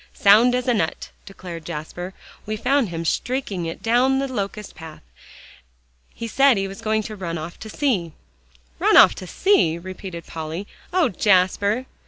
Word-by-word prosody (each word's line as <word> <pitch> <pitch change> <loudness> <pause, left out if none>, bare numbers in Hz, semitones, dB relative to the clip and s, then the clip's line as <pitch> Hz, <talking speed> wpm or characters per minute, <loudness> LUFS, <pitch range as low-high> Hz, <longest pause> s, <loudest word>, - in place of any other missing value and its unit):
"Sound 225 +5 +5
as 250 0 -2
a 245 - +3
nut," 165 -8 -2 0.2
declared 180 -4 -9
Jasper; 175 +3 -6 0.3
"we 215 0 -2
found 260 0 +1
him 165 0 -5
streaking 205 -4 -2
it 165 - -7
down 250 +4 +3
the 275 0 -1
locust 210 -4 -5
path; 160 - -11 1.1
he 230 - -5
said 270 +1 +4
he 195 0 -1
was 195 0 -9
going 215 0 0
to 215 - -7
run 170 -4 -4
off 165 +2 -7
to 220 - -9
sea." 205 - -1 0.7
"Run - - +4
off - - +8
to 185 - -9
sea!" 175 - +2
repeated 185 -1 -8
Polly. 160 +4 -6 0.3
"Oh, 360 -3 +2
Jasper!" 200 +5 +2
200 Hz, 165 wpm, -22 LUFS, 170-245 Hz, 1.1 s, off